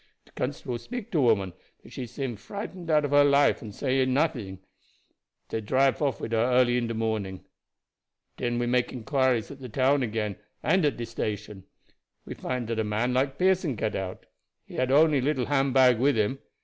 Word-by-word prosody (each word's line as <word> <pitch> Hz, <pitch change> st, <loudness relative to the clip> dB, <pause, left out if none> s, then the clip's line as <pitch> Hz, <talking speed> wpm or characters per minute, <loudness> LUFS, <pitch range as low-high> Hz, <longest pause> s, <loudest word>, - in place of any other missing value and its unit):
De -, -, -23 dB
constable 125 Hz, -2 st, -4 dB
speak 245 Hz, -, -7 dB
to 160 Hz, -, +2 dB
woman, 100 Hz, -7 st, +2 dB, 0.3 s
but -, -, -15 dB
she 125 Hz, -, -5 dB
seem 125 Hz, 0 st, -4 dB
frightened 180 Hz, -, -8 dB
out 150 Hz, -2 st, +3 dB
of 145 Hz, -, -3 dB
her 145 Hz, 0 st, +6 dB
life 145 Hz, 0 st, +4 dB
and 110 Hz, -, -7 dB
no 105 Hz, -, -13 dB
say 135 Hz, -1 st, +1 dB
anything. 130 Hz, -7 st, 0 dB, 0.9 s
Dey 110 Hz, -, -2 dB
drive 130 Hz, +6 st, +2 dB
off 140 Hz, -4 st, 0 dB
wid -, -, -5 dB
her 115 Hz, -, +2 dB
early 125 Hz, +1 st, +3 dB
in 120 Hz, -1 st, 0 dB
de 115 Hz, -, -3 dB
morning. 110 Hz, -4 st, -3 dB, 0.9 s
Den 120 Hz, 0 st, -2 dB
we 120 Hz, -, 0 dB
make 125 Hz, 0 st, +1 dB
inquiries 130 Hz, -1 st, 0 dB
again 140 Hz, -1 st, -11 dB
at 125 Hz, -, -8 dB
de -, -, -11 dB
town 115 Hz, -6 st, +1 dB, 0.3 s
and 180 Hz, 0 st, +3 dB
at 145 Hz, -5 st, +1 dB
de 120 Hz, -, -4 dB
station. 105 Hz, -3 st, -5 dB, 0.6 s
We -, -, -6 dB
find 125 Hz, -2 st, -3 dB
dat 115 Hz, 0 st, -3 dB
a -, -, +2 dB
man 110 Hz, +4 st, -1 dB
like 135 Hz, +1 st, 0 dB
Pearson 185 Hz, -6 st, +2 dB
get 110 Hz, 0 st, -2 dB
out. 95 Hz, -1 st, -5 dB, 0.4 s
He -, -, -14 dB
had 130 Hz, 0 st, 0 dB
only 150 Hz, -1 st, +5 dB
little 135 Hz, -2 st, 0 dB
hand 135 Hz, -2 st, +1 dB
bag 125 Hz, -3 st, +5 dB
with 135 Hz, 0 st, +3 dB
him. 110 Hz, +5 st, 0 dB
125 Hz, 200 wpm, -27 LUFS, 110-140 Hz, 0.9 s, her